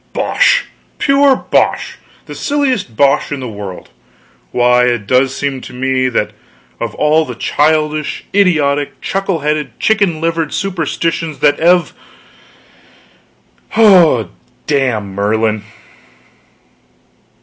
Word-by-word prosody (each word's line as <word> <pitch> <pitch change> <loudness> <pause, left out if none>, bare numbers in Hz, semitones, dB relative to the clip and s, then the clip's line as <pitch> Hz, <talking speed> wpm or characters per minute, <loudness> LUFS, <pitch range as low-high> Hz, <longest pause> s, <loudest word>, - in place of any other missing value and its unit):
Bosh, - - +2 0.3
pure 275 -1 +3
bosh, - - -1 0.3
the - - -9
silliest 265 - -1
bosh 140 0 +2
in 145 - -3
the 130 - -5
world! 100 -4 -8 0.6
Why, 125 0 +3
it 120 -4 -1
does 130 +4 +2
seem 135 -2 -3
to - - -11
me 130 0 0
that 115 -3 -1 0.5
of - - -4
all 155 +1 +2
the 125 -5 -7
childish, 150 +3 0
idiotic, 150 -8 +1
chuckle 195 -4 -2
headed, 150 -4 -2
chicken 200 -7 +1
livered 165 -1 -2
superstitions 165 -4 -2
that 145 -1 +3
ev 175 +1 +3 1.8
oh, 170 - +5 0.3
damn 125 -9 -1
Merlin!" 105 +1 -1
145 Hz, 105 wpm, -14 LUFS, 125-170 Hz, 1.8 s, oh